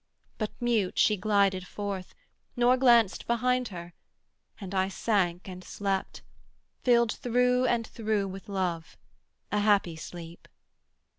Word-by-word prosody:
but 215 -2 -2
mute 230 -6 0
she 215 - +4
glided 195 -2 +1
forth, 200 -3 -5 0.4
Nor 245 0 +4
glanced 235 -5 +4
behind 250 +1 +1
her, 175 -3 -9 0.7
and 195 -2 -7
I 190 0 +2
sank 190 -3 0
and 185 -1 -8
slept, 195 -1 -3 0.6
Filled 235 -2 +4
through 250 +1 +1
and 235 -2 +1
through 215 -3 -1
with 195 +1 -9
Love, 180 -4 -3 0.5
a 210 - +1
happy 205 -5 +2
sleep. 165 +1 -10
205 Hz, 125 wpm, -28 LUFS, 185-235 Hz, 0.7 s, she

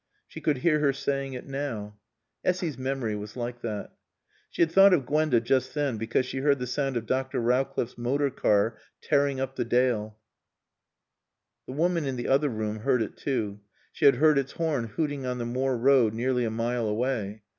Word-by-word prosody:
She - - -10
could 150 -3 +1
hear 155 +3 +2
her 145 -2 +2
saying 135 0 -2
it 125 - -7
now. 115 -7 -5 0.4
Essy's 180 -5 0
memory 130 -4 -2
was 105 +3 -7
like 120 0 -4
that. 105 -3 -5 0.6
She - - +2
had 165 - 0
thought 195 +1 +7
of 140 -7 -2
Gwenda 150 -3 +2
just 130 +3 0
then 145 -6 0
because 115 +3 0
she 130 - -4
heard 140 +1 +3
the 125 - -4
sound 135 +1 -1
of 115 - -4
Dr. 130 +2 -1
Rowcliffe's 120 0 0
motor 140 +4 0
car 105 0 +1 0.2
tearing 140 -1 +1
up 135 0 -3
the - - +1
Dale. 115 -3 0 1.5
The 130 - -6
woman 165 0 +1
in 135 - -2
the 120 - -4
other 140 +2 +3
room 110 -2 -3
heard 125 0 +2
it 105 - -7
too. 110 -7 -2 0.3
She - - -2
had 140 - +7
heard 150 +2 +4
its 135 0 -4
horn 155 -8 -1
hooting 140 +3 -3
on 125 0 -2
the 120 - -3
moor 130 +2 -1
road 120 -3 +4
nearly 125 +1 0
a - - 0
mile 115 +1 -1
away. 110 -2 -2
130 Hz, 190 wpm, -27 LUFS, 115-140 Hz, 1.5 s, thought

